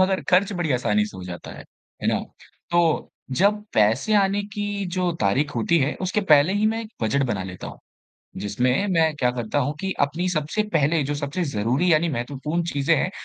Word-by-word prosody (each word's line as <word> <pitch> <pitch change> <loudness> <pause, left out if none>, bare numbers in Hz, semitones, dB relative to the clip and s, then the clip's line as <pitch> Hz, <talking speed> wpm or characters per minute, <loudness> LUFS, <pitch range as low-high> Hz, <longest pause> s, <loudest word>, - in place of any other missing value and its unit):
मगर 190 0 +2
खर्च 190 +3 +4
बड़ी 175 -6 -1
आसानी 105 -4 +1
से 100 - -11
हो 95 - -8
जाता 90 -1 -8
है, - - -10 0.4
है - - +1
ना। - - +2 0.5
तो 170 -2 +2 0.3
जब 210 +3 +3
पैसे 115 - +3
आने 195 +1 0
की 205 -1 -2
जो 180 -1 +1
तारीख 135 +9 +1
होती 165 +9 +2
है, 140 +1 +1
उसके 185 +3 0
पहले 155 -3 +5
ही 205 +2 +2
मैं 225 +1 0
एक 220 0 -11
बजट 110 +6 +1
बना 105 -6 -2
लेता 90 -1 -7
हूँ, - - -9 0.6
जिसमें 125 - 0
मैं 160 -2 +3
क्या 125 -4 +2
करता 125 +2 -2
हूँ 145 +2 0
कि 195 0 -2
अपनी 160 +6 0
सबसे 160 +4 -1
पहले 155 0 +2
जो 145 - -2
सबसे 145 +5 -2
ज़रूरी 130 +12 +1
यानि 160 +2 +3
महत्वपूर्ण 145 +5 -2
चीज़ें 145 +4 +2
हैं, 180 - 0
155 Hz, 200 wpm, -23 LUFS, 125-185 Hz, 0.6 s, पहले